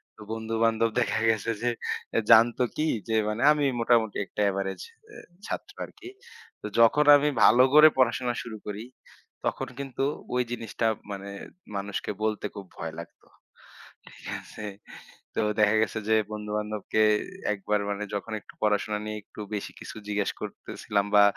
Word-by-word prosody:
তো 110 - -16
বন্ধু-বান্ধব 115 0 +1
দেখা 115 - 0
গেছে, 115 +1 +1
যে 120 - +2 0.6
জানতো 120 +2 +6
কি? 155 - 0 0.2
যে - - 0 0.2
মানে 105 +3 -3
আমি 150 -1 +2
মোটামুটি 115 -3 +2
একটা 105 - -5
এভারেজ 95 0 -3 0.3
অ্যা 430 - -12 0.3
ছাত্র 405 - -5
আরকি। 360 - -12 0.5
তো - - -8
যখন 115 +6 +6
আমি 150 +1 +1
ভালো 125 +3 +7
করে 150 +1 +10
পড়াশোনা 125 -1 +2
শুরু 110 -2 -7
করি, 105 +1 -4 0.6
তখন - - -1
কিন্তু 135 -1 -3 0.3
ওই 125 - +3
জিনিসটা 115 -1 -2 0.2
মানে 100 0 -6 0.5
মানুষকে 100 +1 -3
বলতে 110 -1 -1
খুব 100 - -7
ভয় 80 -1 -5
লাগত, 85 - -11 0.9
ঠিক - - -13
আছে? 105 - -9 0.7
তো - - +1 0.2
দেখা 105 0 +5
গেছে 110 - -3
যে, 110 - +5 0.2
বন্ধু-বান্ধবকে 105 0 -2 0.5
একবার 105 +1 -1
মানে 100 0 -2
যখন 100 +2 -4
একটু - - -16
পড়াশোনা 105 0 +1
নিয়ে 105 0 -4
একটু 105 - -11
বেশি 100 - -4
কিছু - - -9
জিজ্ঞেস 105 -1 0
করতেছিলাম, 100 -1 -3
বা 105 - +8
110 Hz, 150 wpm, -27 LUFS, 105-120 Hz, 0.9 s, করে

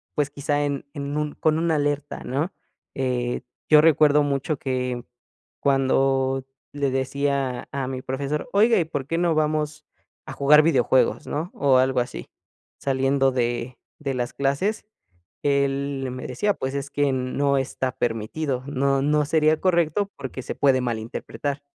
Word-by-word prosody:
pues, 145 -1 +1
quizá 145 +1 -1
en 140 -1 -3
en 140 -1 -4
un 150 -1 -2
con 155 0 +1
una 165 -1 +1
alerta, 145 0 -2
¿no? 145 +8 -2 0.4
Eh, 125 -2 -1 0.3
yo 150 -1 +8
recuerdo 150 -2 +5
mucho 140 +1 -1
que, 125 -2 -2 0.6
cuando 135 -1 +2 0.3
le 140 -2 0
decía 135 -1 -1
a 135 -2 -2
mi 130 -1 -4
profesor: 140 - -3
"Oiga, 220 +4 +5
¿y 165 - +1
por 145 -4 -4
qué 165 - -1
no 170 -2 +2
vamos 150 0 -1 0.4
a 135 - -7
jugar 150 +3 +6
videojuegos, 130 -4 +2
no?". 160 +5 -3
O 135 -2 +3
algo 130 0 +3
así, 120 - -6 0.5
saliendo 135 0 +2
de 120 0 -2 0.2
de 140 -2 -2
las 125 -2 -2
clases, 140 +12 -1 0.6
él 140 -1 0
me 130 - -6
decía: 205 +12 0
"Pues, 130 +1 -4
es 140 0 -3
que 145 -1 +1
no 140 +2 0
está 130 -1 -2
permitido, 125 +4 -2
no 140 -1 +1
no 150 +1 +2
sería 155 +1 +3
correcto, 185 +2 +1
porque 130 -1 -6
se - - -4
puede 135 -2 +3
malinterpretar". 125 +4 -4
140 Hz, 150 wpm, -24 LUFS, 130-150 Hz, 0.6 s, yo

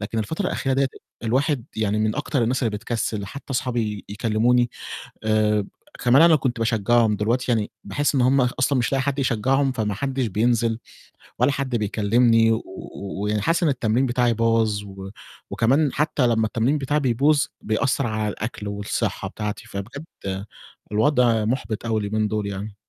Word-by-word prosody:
لكن 110 +2 -3
الفترة 160 - -2
الأخيرة 135 -2 -1
ديّة 135 0 +2 0.4
الواحد 130 +2 +1
يعني 105 -1 0
من 110 +2 0
أكتر 145 -3 0
الناس 125 +3 0
اللي 115 - +1
بتكسِّل. 110 -3 -3
حتّى 140 +7 -10
أصحابي 120 -5 -2
يكلِّموني 115 +3 +2 0.5
آآ 105 -1 +2 0.4
كمان 130 +6 +6
أنا 165 -2 +7
كنت 130 -4 -2
باشجَّعهم 115 0 +2
دلوقتي 120 +4 0
يعني 110 -2 0
باحس 145 +10 0
إن 135 - +3
هُم 130 +2 +4
أصلًا 130 +2 +1
مش 120 +2 0
لاقي 135 -1 +2
حد 140 +1 -2
يشجَّعهم 135 +2 +1
فما 105 -4 -2
حدّش 135 +1 -1
بينزل 115 +2 +1 0.6
ولّا 125 +4 +4
حد 130 -2 -2
بيكلِّمني 115 +2 +3
و - - +3 0.4
و 100 0 -5
ويعني 105 0 0
حاسس 165 - +1
إن 155 - +4
التمرين 125 0 +1
بتاعي 120 -1 +2
باظ 115 -2 +1
و 95 -1 -9 0.4
وكمان 135 +5 +2
حتّى 145 -3 +1
لمّا 110 -1 +2
التمرين 120 +7 +1
بتاعي 145 +2 0
بيبوظ، 140 +3 +2 0.2
بيأثّر 130 +4 0
على 110 -1 -1
الأكل 105 0 -5
والصحّة 100 0 -2
بتاعتي. 105 +1 -5
فبجد 115 +10 -7 0.9
الوضع 115 -1 +3
مُحبِط 115 -2 -2
أوي 110 -1 0
اليومين 105 +1 0
دُول 105 -1 -2
يعني. 100 +1 -5
115 Hz, 165 wpm, -23 LUFS, 105-130 Hz, 0.9 s, أنا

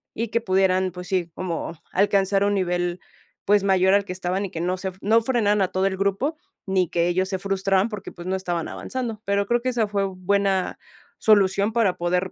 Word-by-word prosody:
y 230 +2 -2
que 230 +1 0
pudieran, 190 -2 +2
pues, 180 0 -8
sí, 175 -3 -1
como 170 -2 -4 0.2
alcanzar 195 0 +2
un 205 - +2
nivel, 175 -1 -1 0.5
pues, 205 0 +4
mayor 190 0 +4
al 200 - +2
que 180 - -5
estaban 185 +2 -2
y 185 - -7
que 165 - -4
no 180 +1 -1
se 190 +1 -3
f 185 +1 -15
no 225 +3 +4
frenaran 210 -5 +2
a 185 - 0
todo 190 +1 +1
el 190 -1 -2
grupo, 200 +11 0 0.3
ni 185 -2 +2
que 170 0 +1
ellos 185 +2 +1
se 190 -1 -2
frustraran 195 +1 +1
porque, 210 -3 -7
pues, 175 0 -10
no 190 - 0
estaban 175 -3 -2
avanzando. 235 -4 -5
Pero 200 0 +1
creo 240 0 +1
que 255 - -1
esa 230 -4 0
fue 200 -1 0
buena 195 0 0 0.4
solución 200 0 +3
para 220 -6 +2
poder 180 +2 0
195 Hz, 215 wpm, -23 LUFS, 185-205 Hz, 0.5 s, pues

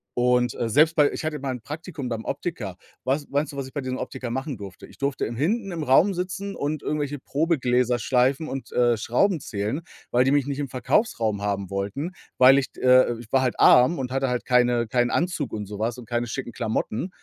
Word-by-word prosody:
und, 125 0 +2
äh, 115 - -2
selbst 155 +6 +4
bei 150 -2 +4
ich - - -5
hatte 150 -2 -2
mal 135 -1 -3
'n 125 - -6
Praktikum 150 - -6
beim 115 -1 -3
Optiker. 105 - -4 0.3
Was 140 +3 0
meinst 145 +2 0
du, - - -8
was 135 - -3
ich - - -14
bei 145 - -3
diesem 130 0 -3
Optiker 120 - -5
machen 130 +1 -3
durfte? 95 -3 -10
Ich - - -18
durfte 140 -1 -1
im 115 - -5
hinten 195 - -1
im 165 -2 -4
Raum 155 +9 +4
sitzen 185 +2 -4
und 145 +1 -3
irgendwelche 145 -1 -2
Probegläser 125 -6 +1
schleifen 130 +6 +1
und, 135 0 -6
äh, 120 -1 +3
Schrauben 160 - +1
zählen, 110 +8 -3 0.3
weil 125 +1 +4
die - - +3
mich 145 -2 +3
nicht 140 0 -3
im 140 - -2
Verkaufsraum 115 - 0
haben 100 -2 -2
wollten. 100 - -3 0.3
Weil 135 +2 +8
ich 130 - -4
d - - -13
äh, 125 -2 +5
ich 115 -2 -12
war 135 - +4
halt 125 -2 -1
arm 125 +8 +6
und 125 -1 -3
hatte 135 0 0
halt 125 -1 -2
keine 125 -2 +3
keinen 120 +1 +1
Anzug 165 -6 -1
und 105 -1 -3
so 105 0 -7
was 115 +2 -1
und 120 -3 -11
keine 120 0 -1
schicken 120 0 -5
Klamotten. 110 - -2
130 Hz, 225 wpm, -24 LUFS, 120-145 Hz, 0.3 s, Weil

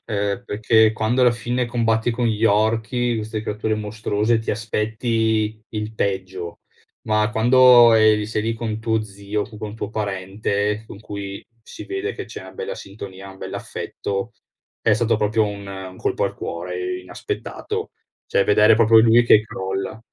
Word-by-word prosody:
ehm, 105 +1 -2
perché 110 0 +3
quando 110 +3 +1
alla 125 - +6
fine 120 +2 -1
combatti 115 -1 +1
con 120 +1 0
gli 110 -1 0
orchi, 115 +3 +2
queste 110 0 -4
creature 110 0 -2
mostruose, 110 +1 0
ti 110 - -3
aspetti 110 0 -1
il 105 0 -4
peggio; 95 -4 -3 0.5
ma 105 0 +2
quando 120 +1 +7
eri 110 -1 +4
sei 110 0 -2
lì 115 +1 0
con 110 -1 -3
tuo 110 -1 0
zio, 100 0 -4
con 105 -1 -12
un 105 - -9
tuo 105 -1 -5
parente, 100 +1 -2
con 100 - -11
cui 100 -2 -7 0.2
si - - -10
vede 390 +3 -3
che - - -6
c'è - - -8
una - - -11
bella 470 +1 -5
sintonia, 95 -1 -9
un 95 - -14
bell'affetto, 100 +4 -5 0.5
è 115 - +3
stato 115 +1 +2
proprio 110 +1 +2
un 100 -1 -5
un 95 -1 -8
colpo - - -1
al - - -2
cuore, 90 +1 -4
inaspettato. 90 -1 -5 0.4
Cioè 100 - +2
vedere 105 +2 +5
proprio 115 0 +6
lui 115 +1 +6
che 110 -2 +7
crolla. 95 0 -4
110 Hz, 160 wpm, -22 LUFS, 100-115 Hz, 0.5 s, quando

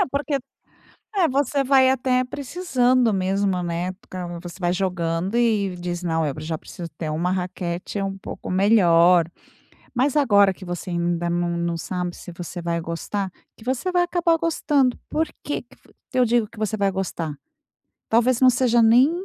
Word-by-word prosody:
É, - - +3
porque 285 +1 -1 0.8
é 360 -4 +4
você 280 +1 +1
vai 260 -1 +5
até 255 -1 +2
precisando 255 - +1
mesmo, 190 -1 0
né? 175 +2 -2
Porque 185 -1 -12 0.2
você 175 +1 -9
vai 175 0 +1
jogando 180 +1 -1
e 210 -6 +2
diz: 175 0 -4
"Não, 165 -2 0
eu 145 - -1
já 160 +1 -3
preciso 170 +1 -9
ter 160 -2 -3
uma 175 +4 0
raquete 180 0 -3
é - - -1
um 195 0 -3
pouco 195 - -8
melhor." 180 -3 +5 0.7
Mas 265 +4 +1
agora 205 -8 +5
que 185 - -12
você 175 +1 -5
ainda 170 0 -1
não 175 0 0
não 170 0 -1
sabe 180 +1 -3
se - - -10
você 175 0 -7
vai 170 0 -1
gostar, 185 +4 -3 0.3
que 220 - -15
você 265 +9 -1
vai 355 -1 +3
acabar 345 -1 +2
gostando. 290 -6 +1
Por 320 +1 0
que 290 - -3
que 245 - -23 0.3
eu 250 - +6
digo 235 -1 +2
que 220 - -17
você 215 0 -1
vai 200 -1 +1
gostar? 175 -5 -3 0.7
Talvez 235 +2 +3
não 260 - +7
seja 240 -1 +3
nem 245 +6 +6
195 Hz, 175 wpm, -23 LUFS, 175-255 Hz, 0.8 s, não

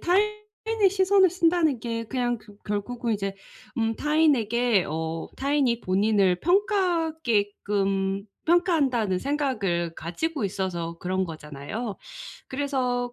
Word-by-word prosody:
타인의 425 +2 +1
시선을 380 0 +4
쓴다는 330 -7 +2
게 230 -1 -3
그냥 240 0 -1
그 205 -2 -17
결국은 225 +3 -2
이제 195 -1 -3 0.4
음 225 0 +1
타인에게 245 - +2
어 160 +1 -3
'타인이 270 -4 +1
본인을 195 -1 +2
평가하게끔 235 - +1 0.2
평가한다.'는 285 - +2
생각을 215 - -1
가지고 270 - -3
있어서 175 -4 -3
그런 185 +1 -1
거잖아요. 160 - -6 0.5
그래서 255 -3 -1
240 Hz, 265 characters per minute, -26 LUFS, 195-320 Hz, 0.5 s, 시선을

